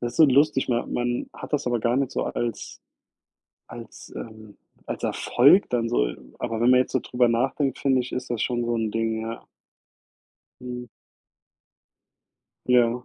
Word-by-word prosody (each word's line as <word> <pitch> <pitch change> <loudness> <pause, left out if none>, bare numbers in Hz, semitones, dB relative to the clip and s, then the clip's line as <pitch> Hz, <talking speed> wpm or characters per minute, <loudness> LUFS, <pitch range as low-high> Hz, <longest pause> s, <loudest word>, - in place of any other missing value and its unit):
das 120 -1 -3
ist - - -12
so 160 - +9
lustig. 140 +1 +3
Ma 120 -1 +1
man 120 0 -2
hat - - -10
das 150 - 0
aber 120 -2 0
gar 120 +2 +1
nicht 135 -1 0
so - - -2
als 120 -2 -4 0.9
als, - - -11
ähm 110 -2 -10 0.3
als - - -6
Erfolg 140 +11 +4
dann 120 -2 0
so. - - +1 0.3
Aber 115 -2 -3
wenn 120 +2 +3
man 125 - +6
jetzt - - -5
so - - +1
drüber 125 -1 +1
nachdenkt, 130 +3 0
finde 130 -2 +2
ich, 125 - -8
ist 130 - -4
das 120 -2 -2
schon 120 -1 -1
so 120 0 0
'n 110 -2 -1
Ding, 110 0 -1
ja. 115 +1 -6 1.2
Mhm. 125 -1 -6 1.8
Ja. 125 0 +3
120 Hz, 170 wpm, -25 LUFS, 115-125 Hz, 1.8 s, so